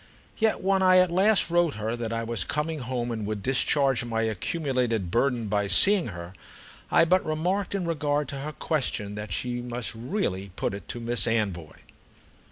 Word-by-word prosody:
Yet 220 -1 +2
when 190 0 +2
I 185 -1 +6
at 185 -1 +4
last 190 0 +3
wrote 175 -3 +2
her 110 +2 -3
that 115 -2 -4
I 115 0 -2
was 115 -5 0
coming 150 - -2
home 125 -1 -3
and 110 -2 -4
would 105 -2 -4
discharge 135 -1 +2
my 115 -1 -1
accumulated 115 - -1
burden 120 0 +1
by 105 -1 0
seeing 195 - +5
her, 85 -3 -8 0.6
I - - +5
but 185 +3 +3
remarked 180 +6 -1
in 190 -3 -2
regard 150 -3 -1
to 140 - -5
her 150 +3 -5
question 130 -10 -2
that 105 0 -6
she 120 -1 -1
must 120 -2 -4
really 110 - -3
put - - -2
it 100 - -8
to 120 - -6
Miss 120 +1 +1
Anvoy. 100 -8 -2
125 Hz, 180 wpm, -26 LUFS, 110-165 Hz, 0.6 s, I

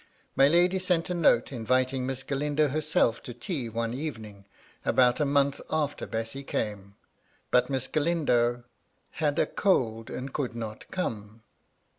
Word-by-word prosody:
My 135 - +6
lady 175 +4 +3
sent 180 -2 0
a - - +1
note 155 -9 +3
inviting 130 +2 0
Miss 135 0 -4
Galindo 145 +2 0
herself 150 -5 +1
to 120 - -8
tea 125 -1 -3
one 115 +1 -2
evening, 110 -8 -6 0.4
about 125 -1 +3
a 150 - +2
month 140 0 +2
after 150 -2 -1
Bessy 115 +5 -4
came; 100 -5 -4 0.6
but 125 +1 +3
Miss 130 -2 -1
Galindo 130 -7 +1 0.5
"had 150 -2 -1
a - - +3
cold 115 - 0
and 130 +1 -6
could 130 -5 -2
not 110 -2 -7
come." 110 - -4
130 Hz, 145 wpm, -28 LUFS, 115-150 Hz, 0.6 s, My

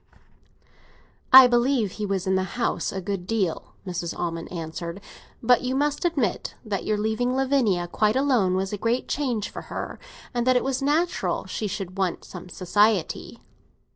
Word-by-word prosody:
"I 260 0 +12
believe 240 -3 +2
he 210 +1 -4
was 195 -2 -1
in 190 - +1
the 190 - +2 0.2
house 180 -8 0
a 190 - -4
good 190 -1 -4
deal," 200 -7 -2
Mrs. 175 -2 -4
Almond 165 -1 -4
answered. 170 +1 -5 0.4
"But 245 +1 +5
you 255 +1 -1
must 295 +3 0
admit 280 - -1
that 205 -3 -2
your 215 - +1
leaving 220 +4 0
Lavinia 255 -10 +2
quite 210 +4 +1
alone 250 -9 +2
was 190 +2 -1
a 205 - -3
great 230 +4 0
change 245 -7 -1
for - - -6
her, - - -5 0.3
and 240 0 -1
that 255 - +5
it 250 - +3
was 265 0 -1
natural 310 +5 0
she 215 - -3
should 195 -1 -5
want 185 -3 -1
some 180 -1 -10
society." 200 +1 +1
215 Hz, 170 wpm, -25 LUFS, 185-255 Hz, 0.4 s, I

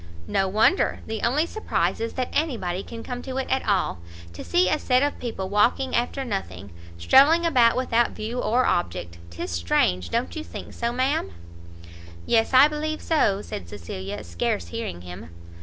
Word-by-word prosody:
"No 195 - 0
wonder! 215 - +2
the 220 -1 -4
only 275 +7 +2
surprise 435 +5 -1
is 230 - -3
that 255 -1 -3
any 300 -4 0
body 180 -1 -3
can 230 +2 -9
come 245 -1 -5
to 260 0 -6
it 265 - -1
at 265 - +1
all. 195 - +1 0.3
To - - -8
see 355 +1 +2
a 305 - +1
set 255 +1 +2
of 290 - -1
people 220 -6 -4
walking 235 +6 +2
after 255 +3 -1
nothing! 100 - -5 0.3
strolling 285 - +5
about 250 -8 +4
without 240 -2 +2
view 225 +3 -5
or 245 +2 +2
object! 85 -1 -2
'tis 85 0 -6
strange! 85 +1 +1
don't 240 +6 -2
you 315 - -4
think - - -9
so, 235 0 -2
ma'am?" 255 - 0 1.0
"Yes, 225 -1 +2
I 265 +2 +8
believe 310 +1 -3
so," 205 -11 +1
said 85 - -7
Cecilia, 95 +2 -6
scarce 85 0 -2
hearing 85 +1 -5
him. 90 -2 -9
230 Hz, 175 wpm, -24 LUFS, -, 1.0 s, I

